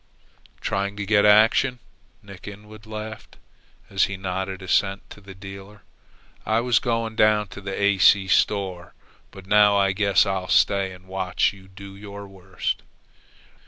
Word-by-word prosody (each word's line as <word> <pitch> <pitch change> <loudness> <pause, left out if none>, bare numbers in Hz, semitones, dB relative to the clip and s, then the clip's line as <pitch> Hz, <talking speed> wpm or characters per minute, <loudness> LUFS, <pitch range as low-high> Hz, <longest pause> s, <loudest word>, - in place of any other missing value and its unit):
"Trying 100 +1 -2
to 105 - -4
get 105 0 +3
action," 110 +5 +4 0.5
Nick 100 -2 -13
Inwood 105 +1 -12
laughed, 110 0 -8 0.5
as 95 - +2
he 100 - -6
nodded 95 0 -4
assent 95 +1 0
to 105 - -12
the 95 -1 -12
dealer. 95 +2 -11 0.6
"I 110 +1 +1
was 120 -1 +2
going 115 -2 -2
down 105 -1 +3
to 100 - -10
the 100 -1 -5
A. 100 -1 +2
C. 95 +2 +5
store, 95 -2 0 0.3
but 95 -2 -13
now 105 0 +4
I 100 -1 +3
guess 100 0 +3
I'll 95 -2 -2
stay 100 -1 +2
and 90 0 -14
watch 95 0 -1
you 95 -1 -16
do 95 +1 -12
your 100 0 -10
worst." 95 -2 -5
100 Hz, 155 wpm, -23 LUFS, 95-105 Hz, 0.6 s, C